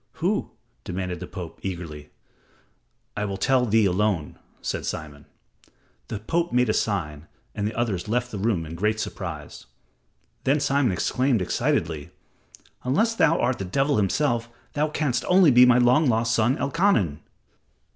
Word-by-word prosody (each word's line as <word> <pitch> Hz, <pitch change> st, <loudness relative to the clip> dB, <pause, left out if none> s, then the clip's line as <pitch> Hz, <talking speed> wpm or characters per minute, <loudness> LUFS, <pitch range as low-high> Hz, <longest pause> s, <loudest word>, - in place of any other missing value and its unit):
"Who?" -, -, -1 dB, 0.3 s
demanded 90 Hz, 0 st, -4 dB
the -, -, -7 dB
Pope, 90 Hz, -2 st, -8 dB
eagerly. 85 Hz, -6 st, -6 dB, 1.1 s
"I 105 Hz, -, -2 dB
will 100 Hz, -1 st, -3 dB
tell 125 Hz, +4 st, +2 dB
thee 110 Hz, 0 st, +4 dB
alone," 95 Hz, -5 st, 0 dB, 0.2 s
said -, -, -3 dB
Simon. 75 Hz, -1 st, -6 dB, 0.8 s
The 110 Hz, -, -4 dB
Pope 165 Hz, +11 st, -1 dB
made 125 Hz, -1 st, +2 dB
a -, -, +3 dB
sign, 85 Hz, -9 st, -2 dB, 0.3 s
and 105 Hz, -1 st, -2 dB
the 110 Hz, -, -5 dB
others 110 Hz, -6 st, -1 dB
left 125 Hz, +3 st, -1 dB
the 105 Hz, -, -5 dB
room 100 Hz, -6 st, 0 dB
in 80 Hz, -, -8 dB
great 105 Hz, +5 st, 0 dB
surprise. 80 Hz, -, -6 dB, 0.8 s
Then 140 Hz, +3 st, +2 dB
Simon 140 Hz, -4 st, +2 dB
exclaimed 125 Hz, +6 st, +1 dB
excitedly, 80 Hz, -3 st, -1 dB, 0.7 s
"Unless 210 Hz, -, +2 dB
thou 165 Hz, -7 st, +3 dB
art 125 Hz, +1 st, 0 dB
the -, -, -2 dB
devil 135 Hz, +10 st, +1 dB
himself, 115 Hz, +3 st, 0 dB, 0.2 s
thou 150 Hz, +1 st, +1 dB
canst 145 Hz, -5 st, -1 dB
only 180 Hz, -4 st, +6 dB
be 125 Hz, 0 st, +7 dB
my 125 Hz, -1 st, +6 dB
long 125 Hz, +5 st, +4 dB
lost 115 Hz, 0 st, +1 dB
son, 120 Hz, +4 st, +2 dB
Elkanan." 140 Hz, -, +1 dB
110 Hz, 150 wpm, -24 LUFS, 90-130 Hz, 1.1 s, be